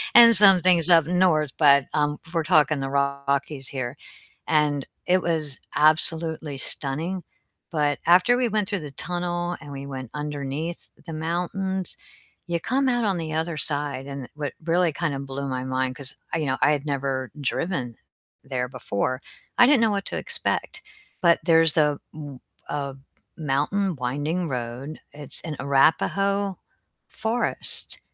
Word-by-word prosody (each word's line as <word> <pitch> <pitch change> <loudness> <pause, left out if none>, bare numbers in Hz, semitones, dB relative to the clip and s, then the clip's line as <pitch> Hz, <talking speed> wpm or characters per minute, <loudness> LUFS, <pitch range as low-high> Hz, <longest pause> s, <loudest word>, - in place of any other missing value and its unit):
and 235 -1 +9
some 195 -2 +8
things 180 -2 +5
up 165 -3 +6
north, 165 -4 +2
but, 140 -3 +6
um, 150 0 0
we're 165 -2 0
talking 155 -2 +3
the 135 0 -3
Rockies 140 0 -1
here, 130 -3 -4 0.5
and 150 -3 +1 0.2
it 185 +1 +3
was 155 -6 +1 0.2
absolutely 160 -1 +2
stunning, 160 +8 0 0.5
but 150 -3 0
after 180 +8 +5
we 250 -1 +1
went 210 -2 0
through 200 -3 -1
the 150 -3 -8
tunnel 175 +3 -3
and 145 -2 -10
we 140 0 -7
went 130 -3 -7
underneath 150 +2 -5 0.2
the 165 - -7
mountains, 180 +4 0 0.5
you 170 -1 -1
come 260 +8 0
out 240 -1 +1
on 195 -3 +1
the 160 -2 -4
other 160 +1 -1
side, 145 -3 +1
and 140 -3 -7
what 145 -2 -4
really 170 +1 +2
kinda 155 -3 -2
blew 140 0 -5
my 130 -1 -3
mind 130 0 -2
'cause 135 -2 -4 0.2
I 165 - +1
you 155 - -2
know, 130 0 0
I 145 - +5
had 145 -1 -1
never 135 -2 -2
driven 135 -4 -2 0.5
there 130 -2 -3
before, 130 0 -3 0.4
I - - +8
didn't 275 0 +5
know 225 - +4
what 200 -1 -1
to - - -3
expect, - - -2 0.4
but 170 -3 +4
there's 165 -2 +4
a 150 -2 +2
m 145 -4 -9 0.3
a 140 -2 -3 0.4
mountain 160 +6 0
winding 145 +7 -2
road, 125 +4 -5
it's 145 -2 -5
in 160 -3 -5
Arapahoe 195 +8 +2 0.5
Forest, 230 +2 -1
150 Hz, 155 wpm, -24 LUFS, 140-175 Hz, 0.5 s, and